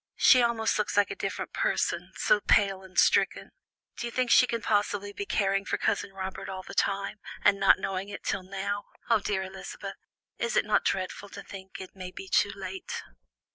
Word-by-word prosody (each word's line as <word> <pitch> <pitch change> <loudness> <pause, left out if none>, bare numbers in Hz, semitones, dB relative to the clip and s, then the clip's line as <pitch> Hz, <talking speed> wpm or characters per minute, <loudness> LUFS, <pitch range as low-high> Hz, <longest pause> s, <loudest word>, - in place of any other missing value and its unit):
She 255 - +7
almost 230 -2 +1
looks 210 - -1
like 205 -1 +4
a - - -3
different - - -4
person, - - 0
so - - +3
pale 195 - +3
and 185 -1 -14
stricken. - - +3 0.5
Do 240 - -3
you - - -6
think 250 0 0
she 250 - +7
can 230 -1 -3
possibly 205 -1 0
be 200 0 -5
caring 195 -1 +1
for - - -1
Cousin 200 - 0
Robert 190 -1 -6
all 190 -1 -5
the - - -10
time, 195 0 0 0.2
and 200 -1 +5
not 195 - +6
know 190 0 -3
it 200 +2 -6
till 195 - -1
now? 200 +2 -4 0.3
Oh, 225 - +6
dear 195 -1 -1
Elizabeth, 190 0 -7 0.4
is 475 - -1
it - - +3
not - - +2
dreadful 195 +1 -2
to - - -9
think 190 -1 -10
it 190 0 -9
may 185 -1 -6
be 190 +1 -9
too 200 - +3
late?" 190 -1 -6
200 Hz, 200 wpm, -28 LUFS, 190-205 Hz, 0.5 s, She